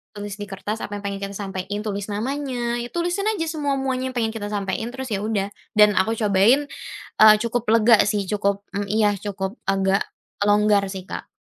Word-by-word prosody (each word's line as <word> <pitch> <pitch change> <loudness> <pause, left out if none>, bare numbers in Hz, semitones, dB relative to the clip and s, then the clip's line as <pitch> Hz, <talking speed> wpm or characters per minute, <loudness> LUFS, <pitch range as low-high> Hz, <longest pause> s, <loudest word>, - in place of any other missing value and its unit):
tulis 205 -1 -6
di - - -3
kertas 205 +2 -4
apa 205 - -9
yang - - -13
pengen 200 0 -2
kita 200 0 -4
sampein, 195 0 -4
tulis 200 -2 -3
namanya, 245 +1 -2
ya - - -4
tulisin 350 +3 -1
aja 335 -6 -2
semua-muanya 270 -4 -1
yang - - -17
pengen 225 -2 +1
kita 210 -2 -4
sampein, 205 +2 -2
terus 265 0 -6
ya 195 - 0
udah. 205 -3 0 0.3
Dan 210 -1 +6
aku 220 +4 +2
cobain, 215 +7 +4 0.6
eee, 215 0 +10
cukup 235 0 -1
lega 225 -1 +6
sih, 205 -1 0
cukup 200 -1 0 0.2
mmm, 205 - -1
iya 210 -1 +3
cukup 195 +2 -4
agak 195 0 +2 0.4
longgar 205 -1 +4
sih, 190 -1 -6
Kak. - - -6
210 Hz, 190 wpm, -23 LUFS, 200-240 Hz, 0.6 s, eee